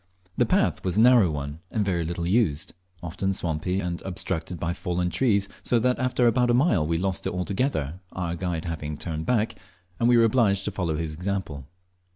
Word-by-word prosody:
The - - +2
path - - +1
was 95 +1 -1
a - - +6
narrow 120 -6 +6
one, 75 0 -5
and 105 -3 -1
very 90 -4 0
little 85 +1 -3
used, 90 -6 +1 0.3
often 95 +3 -2
swampy 90 +2 -1
and 90 -2 -3
obstructed 90 -2 -3
by 85 +2 -1
fallen 90 -1 -2
trees, 100 +1 +2
so 120 - +2
that 125 +2 +1
after 125 -1 +1
about 120 +1 +3
a 120 - +4
mile 120 - +3
we 85 0 +1
lost 95 +1 -2
it - - -2
altogether, 90 - -1
our 85 -2 -3
guide 85 -2 -3
having 75 -3 -4
turned 80 -1 -5
back, 115 -3 +1 0.5
and 120 - +3
we 120 - +6
were 115 - +6
obliged 110 -4 +3
to - - -1
follow 85 -5 -2
his 80 -1 -3
example. 85 -6 -4
90 Hz, 195 wpm, -25 LUFS, 80-110 Hz, 0.5 s, a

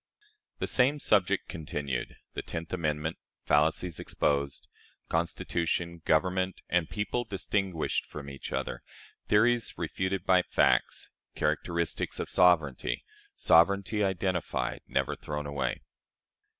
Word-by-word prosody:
The - - -1
same 135 +3 +4
Subject 100 -7 +2
continued. 75 -4 -4 0.2
The - - -3
Tenth 80 +1 -6
Amendment. 80 -2 -1 0.3
Fallacies 80 +3 +2
exposed. 70 -1 -1 0.4
"Constitution," 85 0 -1
"Government," 95 +3 +1
and 85 -2 +1
"People" 105 +3 -1
distinguished 95 -5 -1
from 75 -2 -8
each 70 -1 -7
other. - - -3 0.5
Theories 115 +2 +3
refuted 95 -1 -2
by 90 -1 +5
Facts. - - +1 0.2
Characteristics 85 -3 -1
of - - -4
Sovereignty. 75 -9 +3 0.3
Sovereignty 100 +5 +4
identified. 90 -9 -1
Never - - 0
thrown 75 0 -5
away. 70 -1 -2
85 Hz, 105 wpm, -29 LUFS, 75-95 Hz, 0.5 s, by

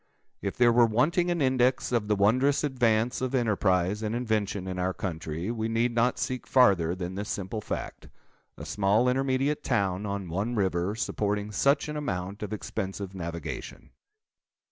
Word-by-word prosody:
If 100 - -4
there 120 -1 +5
were 120 0 +6
wanting 160 +11 +2
an 170 -4 +1
index 130 0 +2
of 115 -4 0
the 105 - +2
wondrous 130 +9 +3
advance 120 -4 +1
of 130 +1 -1
enterprise 100 -4 +1
and 110 +1 -2
invention 105 -5 -1
in 90 -1 -4
our 90 +1 -1
country, 85 +1 -4
we 110 -1 -2
need 115 +2 +1
not 120 +2 +2
seek 130 -1 -3
farther 95 -10 +4
than 90 0 -5
this 100 +2 -5
simple 100 +2 -3
fact—a - - -9
small 105 +4 +2
intermediate 135 +3 +1
town, 100 -4 0
on 100 -2 -3
one 100 +8 -2
river, 95 -1 0
supporting 105 -2 -2
such 140 +7 +2
an 150 0 -4
amount 100 -8 -4
of 105 - -4
expensive 95 -2 -4
navigation. 85 -2 -6
105 Hz, 160 wpm, -28 LUFS, 95-125 Hz, -, were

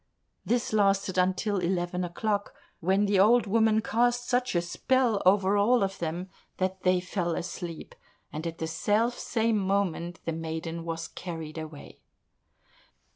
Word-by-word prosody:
This 240 -1 0
lasted 195 -2 +2
until 190 +2 +1
eleven 180 0 -1
o'clock, 205 +4 -2 0.2
when 190 +4 +2
the 200 -1 +2
old 230 +5 +5
woman 220 +1 +3
cast 240 +2 +1
such 250 -4 0
a 175 - +3
spell 235 +4 +1
over 195 +1 +4
all 235 +3 +4
of 195 0 -3
them 170 +2 -3 0.3
that 190 0 -2
they 185 0 +3
fell 180 -2 -2
asleep, 170 -2 -6 0.4
and 155 +3 -4
at 165 0 -5
the 160 - -3
self 215 +8 0
same 225 -2 +1
moment 190 -3 -1
the 165 - -1
maiden 165 +1 -4
was 165 0 -4
carried 165 -3 -7
away. 155 -2 -10
190 Hz, 145 wpm, -28 LUFS, 170-215 Hz, 0.4 s, old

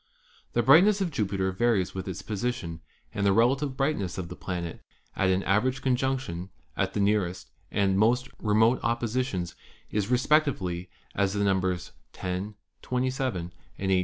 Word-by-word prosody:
The 120 - +2
brightness 185 - +6
of 185 -4 -1
Jupiter 100 -7 0
varies 105 -3 +1
with 95 0 -5
its 95 -2 -5
position, 105 -6 -3 0.3
and 100 - -2
the 100 - +4
relative 130 +6 +2
brightness 135 - 0
of 90 -2 -4
the 90 - -7
planet 85 -3 -5 0.3
at 95 - +2
an 95 +1 +2
average 130 +7 +1
conjunction 130 -9 -1 0.3
at 95 0 0
the - - 0
nearest 95 - 0 0.2
and 95 -1 +2
most 125 +4 +3
remote 110 +3 +3
oppositions 115 -5 -1 0.4
is 105 0 -1
respectively 125 - +1 0.2
as 100 -1 +1
the 100 0 0
numbers 95 -2 0 0.2
10, 95 +3 -4 0.3
27, 125 -8 -2 0.2
and 95 -1 -1
18. 95 - +4
105 Hz, 150 wpm, -27 LUFS, 95-125 Hz, 0.4 s, brightness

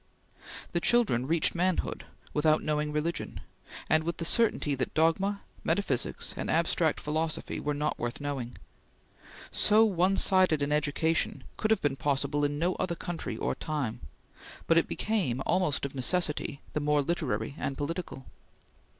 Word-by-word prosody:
The 170 - +1
children 195 - +3
reached 165 +1 +2
manhood 180 +1 -1 0.3
without 155 +1 +3
knowing 150 0 0
religion, 150 +3 -2 0.5
and 155 0 +3
with 170 +1 -3
the 165 - -3
certainty 210 -7 +2
that 135 - -3
dogma, 190 +6 +2 0.2
metaphysics, 145 -11 -1
and - - -4
abstract - - +2
philosophy 155 +1 -2
were 150 0 -2
not 150 +1 -1
worth 120 0 -3
knowing. 135 -4 -4 0.9
So 215 +2 +5
one 190 -1 +2
sided 185 -6 +4
an 145 - -1
education 150 +2 0
could 215 - -1
have 220 - +2
been 140 -2 +1
possible 145 +1 0
in 145 0 0
no 175 +4 +1
other 170 -2 -1
country 175 0 -5
or - - -1
time, 140 -8 -3 0.7
but 165 0 +5
it - - -1
became, 170 - -1
almost 180 -7 +1
of 140 - -5
necessity, 150 +1 0
the - - 0
more 150 0 +2
literary 135 -7 -2
and 135 - -3
political. 160 -3 -4
155 Hz, 150 wpm, -29 LUFS, 145-175 Hz, 0.9 s, So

